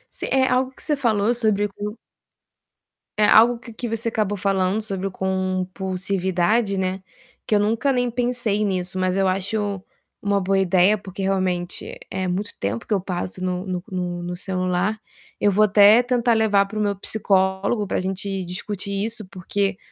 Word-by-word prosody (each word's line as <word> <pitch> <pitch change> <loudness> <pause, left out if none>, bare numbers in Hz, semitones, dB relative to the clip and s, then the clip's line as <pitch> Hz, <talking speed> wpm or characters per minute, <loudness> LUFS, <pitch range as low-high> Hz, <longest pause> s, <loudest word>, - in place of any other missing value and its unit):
Se - - -4
é 265 -1 +3
algo 255 +1 +1
que - - -9
você 300 - +1
falou 225 -4 +1
sobre 215 -4 +2
o 200 - -6
q 210 +2 -6 1.2
é 210 - +4
algo 230 +3 +6
que 235 -1 -11
que 240 +2 -5
você 225 +1 -1
acabou 210 -2 -1
falando 195 +1 +1
sobre 195 -3 -4
o 195 - -5
compulsividade, 190 +2 -1
né, 185 0 -2 0.4
que - - -1
eu - - +4
nunca 225 +6 +1
nem 245 -1 +1
pensei 240 -3 0
nisso, 185 -2 -2
mas 185 0 0
eu 195 -1 +2
acho 200 +1 -1 0.4
uma 200 0 +1
boa 195 +1 +1
ideia, 190 +2 +4
porque, 195 -1 -8
realmente, 185 -2 -2
é 190 0 -2
muito 195 +4 -3
tempo 100 +4 -3
que 215 - 0
eu 195 - +1
passo 185 0 -4
no 180 0 -2
no 180 -1 -3
no 175 -1 -3
no 175 0 -5
celular. 185 +2 -1 0.4
Eu 205 - +3
vou 210 +2 +4
até 210 +3 +7
tentar 245 -1 +1
levar 210 -3 +3
para 215 +2 -6
o - - +1
meu 205 -1 0
psicólogo 195 +1 +1
pra - - -1
gente 190 +1 -3
discutir 200 +2 -4
isso, 220 -3 -4
porque 195 +2 -2
195 Hz, 180 wpm, -22 LUFS, 185-215 Hz, 1.2 s, até